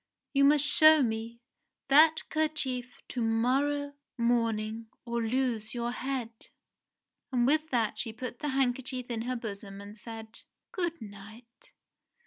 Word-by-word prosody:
You 280 0 +5
must 295 0 +5
show 310 0 +6
me 230 0 -3 0.5
that 310 +3 +6
kerchief 300 -6 -1
to 245 - -3
morrow 270 +6 +1 0.2
morning 230 -2 0 0.2
or 235 -1 -1
lose 230 -1 -1
your 240 0 -1
head." 255 -2 -3 1.0
And 245 -2 +2
with 310 +4 +2
that 230 -5 0
she 225 - -3
put 240 +2 -7
the 295 - -2
handkerchief 255 -1 -1
in 225 -1 -2
her 250 +2 -2
bosom 200 -4 -6
and 200 +1 -10
said, 225 0 -8 0.3
"Good 345 -3 -2
night 220 +4 -13
245 Hz, 130 wpm, -30 LUFS, 225-275 Hz, 1.0 s, show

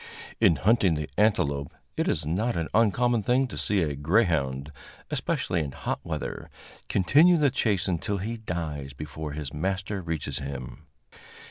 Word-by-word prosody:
In 85 - +5
hunting 100 -4 +3
the 75 -1 -3
antelope, 70 -10 +1 0.2
it - - 0
is 75 - 0
not 105 +10 0
an 80 -1 -2
uncommon 115 +2 +3
thing 125 +6 +2
to 125 - -7
see 100 -3 +1
a 75 -3 -2
greyhound, 75 - +1 0.4
especially - - 0
in 75 -4 -3
hot - - -3
weather, - - -5 0.4
continue 155 - +5
the 145 -4 +3
chase 105 -8 +1
until 95 +3 -1
he 110 +5 -3
dies 80 -9 -4
before 75 +1 -6
his 75 -2 -5
master 95 +5 -2
reaches 80 -5 -3
him. 70 -4 -7
85 Hz, 150 wpm, -27 LUFS, 75-110 Hz, 0.4 s, In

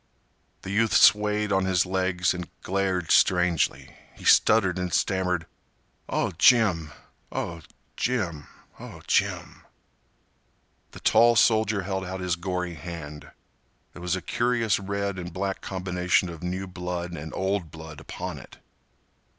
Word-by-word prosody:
The 95 - -6
youth 110 +2 +2
swayed 105 0 +4
on 95 -1 +2
his 95 -1 +2
legs 95 -1 0
and 90 -1 -6
glared 95 -3 -1
strangely. 90 -3 +2 0.2
He - - -13
stuttered 95 -5 +4
and 90 -1 -3
stammered. 90 -1 0 0.6
"Oh, - - 0
Jim—oh, 85 - +1 0.4
Jim—oh, 90 - -5
Jim—" - - -1 1.3
The - - -12
tall 120 0 +5
soldier 110 -3 +3
held 95 0 -3
out 95 +1 -5
his 90 -2 -1
gory 90 0 -3
hand. 75 -2 -8 0.6
There - - -11
was 90 +1 -1
a 90 - -6
curious 120 -4 +1
red 100 -1 -3
and 90 0 -6
black 95 +2 -3
combination 90 -1 0
of 85 -2 -9
new 90 +2 -3
blood 90 -1 -5
and 80 -2 -7
old 95 -3 -1
blood 80 -1 -10
upon - - -6
it. - - -15
90 Hz, 125 wpm, -26 LUFS, 85-100 Hz, 1.3 s, tall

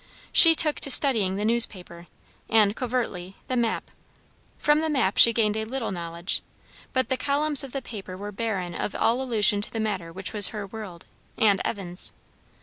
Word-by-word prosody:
She 330 -1 +8
took 305 -2 +1
to - - -2
studying 225 -9 +7
the 205 +2 -4
newspaper, 185 -7 0 0.4
and, 215 -2 +2
covertly, 230 -8 -5
the 255 - -3
map. 235 -2 -3 0.7
From 295 +1 +1
the 320 0 -3
map 260 -10 -1
she 235 - +7
gained 215 -2 -1
a 220 - -4
little 235 0 -6
knowledge; 170 0 -5 0.5
but 260 0 -2
the 260 - -1
columns 290 +1 +1
of 270 - -10
the 275 0 -7
paper 195 -4 -10
were 205 +2 -8
barren 195 -5 -5
of 200 - -6
all 235 +3 -1
allusion 215 -5 +2
to - - -5
the 225 - -6
matter 195 -6 -5
which 190 +4 -8
was 205 -3 +5
her 210 -2 -7
world, 195 -4 -11 0.3
and 205 -3 +1
Evan's. 185 -4 -6
220 Hz, 180 wpm, -23 LUFS, 190-255 Hz, 0.7 s, She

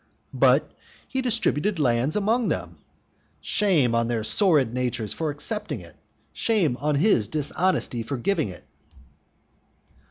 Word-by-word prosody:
"But - - +3 0.4
he 265 - -2
distributed 215 - 0
land 130 0 +1
among 220 +3 +1
them". - - -4 0.6
Shame 170 - +1
on 115 0 +1
their 115 -2 -2
sordid 145 - +3
natures 125 -4 -1
for 160 -2 -3
accepting 210 +9 -4
it! - - -15 0.4
shame 195 - +1
on 150 +2 -1
his 140 - +2
dishonesty 150 - -1
for 130 +4 -4
giving 120 - -1
it! 90 - -11
150 Hz, 125 wpm, -24 LUFS, 120-205 Hz, 0.6 s, But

